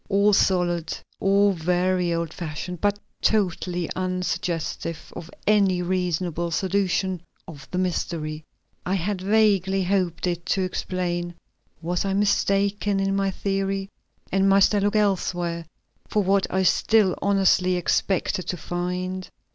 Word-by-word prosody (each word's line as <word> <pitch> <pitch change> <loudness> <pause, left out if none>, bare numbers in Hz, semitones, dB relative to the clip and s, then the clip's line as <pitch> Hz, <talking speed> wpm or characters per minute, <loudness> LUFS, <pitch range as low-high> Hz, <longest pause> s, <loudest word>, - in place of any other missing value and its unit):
All 200 +1 +4
solid, 175 -4 +1 0.2
all 200 +1 +4
very 180 +1 +1
old 170 -1 -2
fashioned, 170 +1 -6
but 205 0 +2 0.2
totally 180 -4 0
unsuggestive 180 -3 -3
of 165 - -8 0.2
any 195 -4 +3
reasonable 175 -2 -1
solution 190 0 0 0.3
of 145 -6 -11
the 180 - -4
mystery 160 -4 -2 0.4
I 185 - 0
had 190 +1 -2
vaguely 195 -2 +3
hoped 180 -3 0
it 175 -1 -2
to 190 - +1
explain. 175 -1 -3 0.5
Was 175 +1 -1
I 195 -1 -1
mistaken 200 0 +1
in 195 0 0
my 195 0 +1
theory, 195 0 -2 0.4
and 195 0 +3
must 195 +1 +5
I 205 - +3
look 205 +1 0
elsewhere 175 -5 0 0.4
for 210 - +1
what 195 +1 +2
I 190 +1 +1
still 200 +1 +3
honestly 190 -2 +3
expected 180 +1 0
to 180 - -2
find? 180 +2 -3
185 Hz, 130 wpm, -24 LUFS, 175-195 Hz, 0.5 s, must